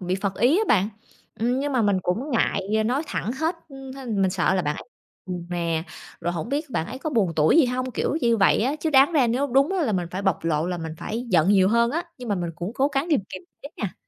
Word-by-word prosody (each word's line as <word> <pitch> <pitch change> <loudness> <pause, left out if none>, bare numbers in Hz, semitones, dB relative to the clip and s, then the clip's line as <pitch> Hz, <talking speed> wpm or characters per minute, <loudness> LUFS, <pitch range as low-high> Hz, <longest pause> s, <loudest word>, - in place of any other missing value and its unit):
bị 180 0 -1
phật 195 -1 -2
ý 255 - +4
á 440 - +2
bạn, 200 -1 +3 0.5
ừm, 245 +3 +1
nhưng 290 +1 -2
mà 250 -4 +2
mình 200 -2 +2
cũng 225 - -2
ngại 215 -3 +1
nói 260 +6 0
thẳng 225 - -3
hết, 320 +5 -1
ưm, 270 -1 -9
h - - -11 0.2
mình 190 - +3
sợ 190 - +1
là 185 - +1
bạn 150 0 -1
ấy - - -7 0.4
buồn 180 -2 -5
nè, 170 -2 -1 0.4
rồi 175 - -1
hổng 175 +6 -4
biết 290 +1 -2
bạn 160 - -1
ấy 255 +4 -7
có 310 - -4
buồn 205 - +1
tủi 155 - +4
gì 315 - +6
hông, 255 +1 -2
kiểu 290 - -1
như 235 -1 +3
vậy 195 - +4
á. 275 +5 0
Chứ 320 - 0
đáng 275 +4 +5
ra 275 -6 +4
nếu 255 +5 0
đúng 275 +6 +2
á 375 -3 0
là 220 - 0
mình 180 -2 -1
phải 185 +2 -4
bộc 190 -4 0
lộ 160 -1 0
là 180 -1 -3
mình 160 -1 -5
phải 235 +3 -4
giận 175 -1 +4
nhiều 190 -2 +5
hơn 235 +1 +3
á, 335 +3 -1 0.2
nhưng 245 - -7
mà 205 - +1
mình 175 -2 -3
cũng 180 +5 -4
cố 275 +2 +2
gắng 275 +4 +1
kiềm 295 - +3
kiềm - - -8 0.2
chế 285 - -7
nha. 200 -5 -4
225 Hz, 275 wpm, -24 LUFS, 185-270 Hz, 0.5 s, gì